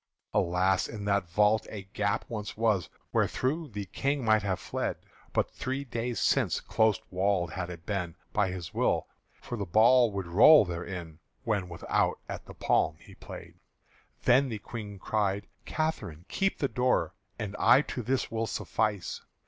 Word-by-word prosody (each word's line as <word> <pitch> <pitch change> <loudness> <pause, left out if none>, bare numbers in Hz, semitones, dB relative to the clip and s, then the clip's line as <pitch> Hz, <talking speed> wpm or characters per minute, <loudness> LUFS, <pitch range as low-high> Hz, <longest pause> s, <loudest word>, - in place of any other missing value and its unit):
(Alas! 90 +2 +2
in 105 -2 -6
that 100 -3 +1
vault 105 +5 +3
a 105 -3 -6
gap 105 +2 0
once 105 -2 -5
was 110 -5 +1 0.2
Wherethro' 155 +5 0
the 100 -1 -4
King 140 +6 -1
might 110 -1 +4
have 95 -3 -1
fled; 95 - -3 0.3
But - - 0
three 135 +2 -3
days 120 -2 -3
since - - +2
close 110 -3 +2
walled 90 -2 +1
had 90 +1 -4
it 85 -1 -9
been 90 -5 -2 0.2
By 105 -3 +2
his 90 -2 -6
will; - - +1 0.3
for 120 - -6
the 100 - -1
ball 115 +5 +5
would 95 -2 -3
roll 110 - +7
therein 85 -2 -6 0.2
When 100 -6 -1
without 80 - 0
at - - -7
the - - -10
palm 75 - +1
he - - -15
play'd.) - - -11 0.6
Then 130 +2 +4
the 110 - -3
Queen 105 -1 -7
cried, 100 0 -1 0.2
"Catherine, 100 - -3
keep 195 - 0
the 140 - +1
door, 125 +1 +1 0.2
And 105 -3 -4
I 135 - +6
to 125 - -4
this 130 +2 -1
will 115 0 -1
suffice!" 105 -5 -2
105 Hz, 165 wpm, -29 LUFS, 95-115 Hz, 0.6 s, roll